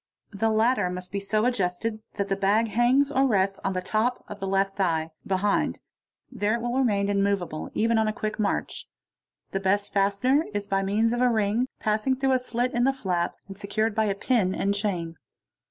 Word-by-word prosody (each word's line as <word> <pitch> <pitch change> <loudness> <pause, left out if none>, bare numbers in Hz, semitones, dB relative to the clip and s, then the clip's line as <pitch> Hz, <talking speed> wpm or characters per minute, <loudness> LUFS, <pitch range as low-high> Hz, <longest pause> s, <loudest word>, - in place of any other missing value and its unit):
The 220 +2 0
latter 220 -2 +2
must 180 0 -7
be 200 - -2
so 215 +2 0
adjustec 215 -1 -1 0.2
that 200 -2 -1
the 195 - 0
bag 205 +4 +2
hangs 250 +6 +3
or 270 -1 +3
rests 195 -4 +1
on 195 - 0
the 185 0 -3
top 225 +5 0
of 210 - -8
the 195 - -3
left 195 0 +1
thigh, 165 -4 0 0.2
behind; 195 +1 0 0.5
there 210 +2 0
11 235 - -4
will 260 - 0
remain 205 -6 +2
immoveable, 200 -5 -1
even 225 +1 +2
on 220 - +2
a - - +1
quick 215 +1 -4
march. 205 -1 -2 0.6
The 195 - -1
best 200 +1 0
fastener 200 +9 +2
i - - +2
by 195 0 +1
means 215 +4 +1
of 240 - -1
a 250 - +4
ring 220 +2 +1
passing 215 +5 +1
through 270 +1 +1
a 255 - +3
slit 250 0 -2
in 240 - +1
the 270 +1 +3
flap, 180 -9 -2
and 195 - -9
secured 215 +2 -1
by 215 -1 +1
pit 200 - -8 0.2
and 200 +1 0
chain. 180 -6 -2
205 Hz, 200 wpm, -26 LUFS, 195-230 Hz, 0.6 s, a